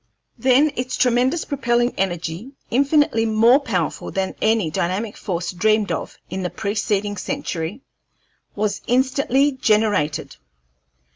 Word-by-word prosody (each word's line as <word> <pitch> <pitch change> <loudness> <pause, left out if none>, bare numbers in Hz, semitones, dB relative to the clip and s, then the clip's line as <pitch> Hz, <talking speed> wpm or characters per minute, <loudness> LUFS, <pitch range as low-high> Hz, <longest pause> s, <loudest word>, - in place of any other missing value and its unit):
Then 265 +4 +3
its 250 +1 -3
tremendous 255 +6 +2
propelling 240 -3 0
energy, 180 - -3 0.2
infinitely 280 -2 +3
more 225 +4 +5
powerful 190 - -2
than 190 -1 -2
any 215 -7 +2
dynamic 190 +7 -2
force 175 -3 -3
dreamed 215 +3 +1
of - - -4
in 190 - -4
the 180 - -2
preceding 205 0 -2
century, 180 +4 -4 0.7
was 205 -1 -1
instantly 265 +2 +2
generated. 210 - 0
220 Hz, 115 wpm, -21 LUFS, 190-255 Hz, 0.7 s, more